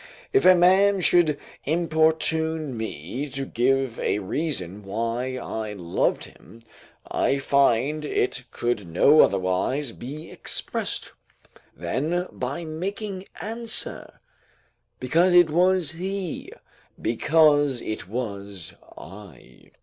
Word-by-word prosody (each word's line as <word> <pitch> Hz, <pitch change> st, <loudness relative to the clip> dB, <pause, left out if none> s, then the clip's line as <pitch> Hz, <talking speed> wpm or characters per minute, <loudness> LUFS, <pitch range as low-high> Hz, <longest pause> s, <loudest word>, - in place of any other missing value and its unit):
If 400 Hz, -, +4 dB
a 185 Hz, -, +9 dB
man 190 Hz, +2 st, +4 dB
should 170 Hz, -5 st, +4 dB, 0.3 s
importune 160 Hz, -2 st, +1 dB
me 110 Hz, -, -5 dB
to 135 Hz, 0 st, -4 dB
give 130 Hz, 0 st, 0 dB
a -, -, 0 dB
reason 105 Hz, -, -2 dB
why 115 Hz, +5 st, -2 dB
I 110 Hz, -3 st, -4 dB
loved 90 Hz, -4 st, -1 dB
him, 115 Hz, +1 st, -17 dB, 0.4 s
I 140 Hz, -, +1 dB
find 140 Hz, +1 st, +2 dB
it 125 Hz, -3 st, -1 dB
could 120 Hz, -6 st, -2 dB
no 140 Hz, -, +6 dB
otherwise 95 Hz, +9 st, +1 dB
be 145 Hz, +8 st, -8 dB
expressed, -, -, -3 dB, 0.7 s
than 150 Hz, -, -1 dB
by 140 Hz, +7 st, -4 dB
making 190 Hz, +4 st, -5 dB
answer: 230 Hz, +2 st, -5 dB, 0.8 s
because 170 Hz, +8 st, +3 dB
it 175 Hz, -3 st, +6 dB
was 180 Hz, 0 st, +2 dB
he, 185 Hz, +1 st, -5 dB, 0.5 s
because 145 Hz, +1 st, +3 dB
it 110 Hz, -4 st, -5 dB
was 100 Hz, -6 st, -5 dB, 0.2 s
I. 90 Hz, -8 st, -13 dB
140 Hz, 105 wpm, -24 LUFS, 110-165 Hz, 0.8 s, a